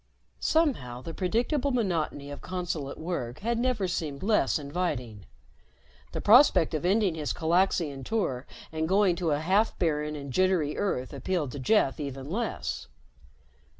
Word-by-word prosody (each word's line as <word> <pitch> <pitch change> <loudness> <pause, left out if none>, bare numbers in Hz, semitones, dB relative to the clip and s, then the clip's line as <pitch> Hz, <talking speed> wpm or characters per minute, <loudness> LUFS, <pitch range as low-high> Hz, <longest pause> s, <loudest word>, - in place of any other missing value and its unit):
Somehow 185 - +1
the 165 - -6
predictable 240 - 0
monotony 170 - -1
of 145 - -8
consulate 175 -6 -4
work 155 -8 -4
had 230 +2 0
never 240 -6 +1
seemed 155 -5 -3
less 210 -9 +2
inviting. 140 - -3 0.8
The - - -4
prospect 205 - +6
of 155 - -1
ending 195 0 +3
his 155 -2 -2
Calaxian 165 -4 +1
tour 140 - -2 0.2
and 160 0 -2
going 195 -1 +4
back 170 - -6
to 170 -3 0
a 145 -1 +1
half 195 +7 +2
barren 150 -3 0
and 140 -3 -7
jittery 185 -4 +2
Earth 130 -11 -2
appealed 175 -8 -2
to 145 - -6
Jeff 135 - +2
even 140 0 -5
less. 225 +3 -3
170 Hz, 150 wpm, -28 LUFS, 145-200 Hz, 0.8 s, prospect